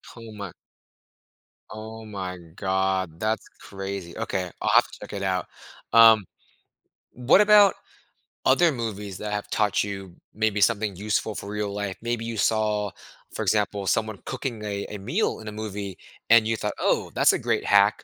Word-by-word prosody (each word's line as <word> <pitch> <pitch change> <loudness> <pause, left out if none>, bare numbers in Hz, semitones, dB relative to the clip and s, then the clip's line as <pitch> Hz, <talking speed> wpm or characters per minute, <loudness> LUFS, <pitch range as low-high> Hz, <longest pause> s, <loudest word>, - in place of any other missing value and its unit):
Oh 115 -2 -10
my 100 -5 -7 1.2
Oh 110 +2 -8
my 95 -3 -5 0.2
god. 95 -3 -1
That's 110 +2 -1
crazy. 95 -3 -6
Okay. 90 -2 -3
I'll - - 0
have - - +6
to - - -14
check - - -9
it 100 -1 -4
out. 95 -1 -1 0.5
Um, 115 -3 +8 0.9
what 125 +10 +4
about, 210 -1 +7 0.7
other 170 -4 +4
movies 105 -5 -5
that 105 0 -4
have 105 0 -3
taught 105 -1 +1
you 95 -3 -7 0.2
maybe 110 -1 0
something 105 -2 +1
useful 110 +2 -1
for 100 0 -7
real 105 -1 -3
life? 100 -2 -3
Maybe 120 0 -2
you 115 0 -4
saw, 105 -1 +1 0.4
for - - -4
example, 100 -1 0
someone 110 -2 0
cooking 120 -4 -4
a 100 -1 -3
a 105 - -6
meal 125 - -1
in 110 - -10
a - - -4
movie, 105 -3 -5 0.3
and 115 -1 +7
you 115 0 0
thought, 105 -1 -2
"Oh, - - +1
that's - - +5
a - - -1
great - - 0
hack," 100 +1 +4
105 Hz, 165 wpm, -25 LUFS, 100-110 Hz, 1.2 s, Um